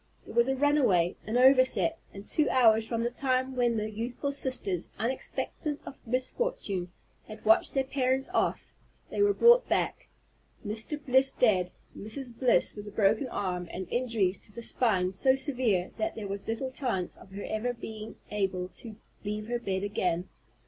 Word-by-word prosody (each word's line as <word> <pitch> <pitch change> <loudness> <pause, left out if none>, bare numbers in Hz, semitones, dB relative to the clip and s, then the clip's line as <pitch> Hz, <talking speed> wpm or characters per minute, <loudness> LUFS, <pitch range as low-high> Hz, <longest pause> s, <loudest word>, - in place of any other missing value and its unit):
There - - -10
was 235 +2 +4
a 265 - +1
runaway, 255 - +3
an 225 +3 0
overset, 260 +5 +4
and 200 +1 -10
two 305 -3 +2
hours 225 -3 +4
from 230 0 -1
the 240 - -1
time 260 0 0
when 240 -2 +2
the 215 0 -2
youthful 240 +6 -3
sisters, 255 - -2
unexpectant 265 +4 -2
of 270 - -9
misfortune, 250 - -2 0.4
had 215 0 -11
watched 220 +5 +4
their 270 - +3
parents 265 0 0
off, - - 0 0.4
they - - -1
were 405 0 +4
brought 480 +1 +6
back, - - 0 0.6
Mr. 220 +8 -3
Bliss 265 +1 +4
dead, 185 -7 +2 0.2
Mrs. 240 +3 -5
Bliss 245 0 +2
with 205 0 -8
a - - -7
broken 215 +5 +2
arm, 180 -6 -3
and 185 0 -5
injuries 225 -7 0
to - - -11
the 235 +3 -8
spine 190 -7 +1
so 260 +7 +3
severe 250 - 0
that 330 0 -1
there 215 -3 -5
was 195 0 -5
little 255 +4 -2
chance 240 -10 -2
of 190 - -16
her 200 - -6
ever 220 +3 -1
being 220 -2 -8 0.2
able 190 -3 -1
to 225 -3 -8 0.3
leave 210 +1 -3
her 240 0 -1
bed 195 -4 -2
again. 180 -3 -1
230 Hz, 170 wpm, -29 LUFS, 200-260 Hz, 0.6 s, brought